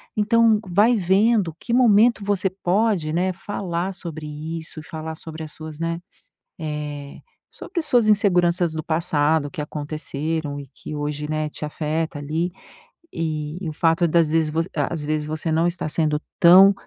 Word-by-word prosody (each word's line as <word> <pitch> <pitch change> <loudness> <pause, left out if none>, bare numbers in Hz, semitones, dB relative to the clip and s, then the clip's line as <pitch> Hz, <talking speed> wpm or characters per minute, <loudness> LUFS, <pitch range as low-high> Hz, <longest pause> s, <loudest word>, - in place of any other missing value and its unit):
Então, 220 0 +4
vai 210 +7 +4
vendo 195 -1 +2
que 235 - -4
momento 230 -2 +5
você 200 -1 +1
pode, 190 -2 0
né, 180 +3 0
falar 185 -1 -3
sobre 160 -4 -7 0.3
isso 160 -1 -9
e 155 - -9
falar 160 0 -6
sobre 160 0 -8
as 155 - -8
suas, 155 -1 -9
né, 165 0 -2 0.6
eh, 150 -2 -5 0.3
sobre 350 - -5
as 320 - -2
suas 240 -6 +3
inseguranças 180 -5 +3
do 160 - -3
passado 155 -2 +1
que - - -5
aconteceram 150 0 -4
e 140 - -9
que 150 - -8
hoje, 150 0 -3
né, 155 0 -1
te 150 - -9
afeta 155 +1 -2
ali. 155 +4 -2 0.6
E, 155 -1 -3
e 165 - -3
o - - -6
fato 165 +2 +2
das 165 -1 +3
vezes 160 -1 +2 0.2
às 150 +1 -1
vezes 150 0 -1
você 155 +1 -2
não 165 +2 +2
estar 175 -2 -2
sendo 150 -2 +1 0.2
tão 190 +3 +8
165 Hz, 165 wpm, -23 LUFS, 155-190 Hz, 0.6 s, tão